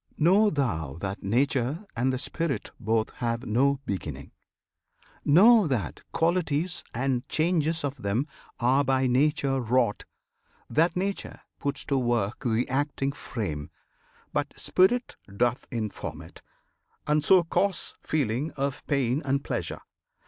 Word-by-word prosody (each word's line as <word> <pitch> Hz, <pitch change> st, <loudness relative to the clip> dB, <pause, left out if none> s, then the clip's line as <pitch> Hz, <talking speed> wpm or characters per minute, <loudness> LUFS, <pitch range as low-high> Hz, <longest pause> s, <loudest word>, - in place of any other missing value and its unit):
Know 195 Hz, +7 st, +5 dB
thou 85 Hz, -, -2 dB
that 100 Hz, +1 st, -4 dB
Nature 130 Hz, -, 0 dB
and 125 Hz, +3 st, +1 dB
the 130 Hz, -, -1 dB
Spirit 160 Hz, +2 st, -3 dB
both 110 Hz, -1 st, 0 dB
Have 120 Hz, +1 st, -2 dB
no 135 Hz, +5 st, +2 dB
beginning! 75 Hz, -8 st, -5 dB, 0.9 s
Know 205 Hz, +6 st, +6 dB
that 115 Hz, -, -2 dB
qualities 165 Hz, -1 st, 0 dB
And 125 Hz, +1 st, -1 dB
changes 160 Hz, -1 st, +1 dB
of 140 Hz, -2 st, -3 dB
them 105 Hz, +7 st, 0 dB, 0.3 s
are 130 Hz, +4 st, +3 dB
by 135 Hz, -1 st, +2 dB
Nature 135 Hz, +1 st, +2 dB
wrought; 120 Hz, -2 st, +1 dB, 0.6 s
That 165 Hz, +3 st, +2 dB
Nature 195 Hz, +2 st, -3 dB, 0.2 s
puts 140 Hz, -, -3 dB
to 140 Hz, -2 st, +1 dB
work 120 Hz, -3 st, 0 dB
the 120 Hz, -1 st, +1 dB
acting 140 Hz, 0 st, -1 dB
frame, 95 Hz, -, -5 dB, 0.6 s
But -, -, -1 dB
Spirit 240 Hz, +7 st, +2 dB, 0.2 s
doth 120 Hz, +1 st, +1 dB
inform 110 Hz, -4 st, -4 dB
it, -, -, -15 dB, 0.6 s
and 150 Hz, 0 st, +2 dB
so 185 Hz, +3 st, +6 dB
cause 190 Hz, +2 st, +1 dB
Feeling 140 Hz, 0 st, -1 dB
of 140 Hz, 0 st, -3 dB
pain 135 Hz, -1 st, +1 dB
and 140 Hz, 0 st, 0 dB
pleasure. -, -, -3 dB
135 Hz, 125 wpm, -27 LUFS, 120-155 Hz, 0.9 s, Know